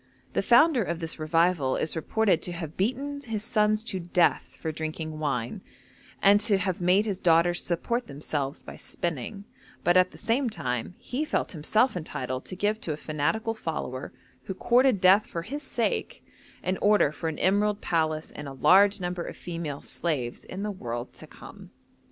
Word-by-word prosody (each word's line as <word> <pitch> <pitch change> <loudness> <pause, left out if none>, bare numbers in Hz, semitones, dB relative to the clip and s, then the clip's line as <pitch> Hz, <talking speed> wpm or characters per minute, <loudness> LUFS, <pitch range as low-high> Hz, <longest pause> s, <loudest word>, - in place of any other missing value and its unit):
The - - +2
founder 255 +2 +5
of 170 -4 -2
this 165 -1 -4
revival 160 -3 +2
is 160 - -2
reported 190 +3 +1
to 180 - -4
have 165 -2 -6
beaten 275 +8 -1
his 225 -5 -4
sons 215 -1 +2
to 195 -5 -3
death 175 0 +1
for 160 - -2
drinking 155 0 -5
wine, 125 -6 -2 0.6
and 200 +1 +7
to 210 -1 +2
have 185 -1 -2
made 185 +4 +4
his 200 -4 -2
daughters 175 0 +3
support 235 +8 -1
themselves 140 0 -4
by - - -9
spinning, 175 - -4 0.4
but 175 - +4
at 185 0 +5
the - - -14
same 235 +4 +1
time 130 - -3
he 265 +5 -3
felt 310 - -1
himself 205 - +1
entitled 130 -6 -4
to 185 - -6
give 210 +3 0
to 155 - -2
a - - -6
fanatical 155 +10 -1
follower, 155 - -4 0.3
who 190 - -4
courted 245 -1 +3
death 195 +3 +6
for 170 - -4
his 280 +10 -5
sake, - - -2 0.4
an 185 +1 -1
order 205 -8 +4
for 160 +1 -3
an 160 - -5
emerald 205 +2 +2
palace 155 -3 -1
and 150 - -6
a 135 - -6
large 195 +9 +5
number 180 -1 -3
of - - -7
female 165 -5 -5
slaves 135 -8 -3
in 190 +2 -6
the 210 - -2
world 120 -9 -5
to - - -11
come. - - -13
180 Hz, 180 wpm, -27 LUFS, 155-210 Hz, 0.6 s, and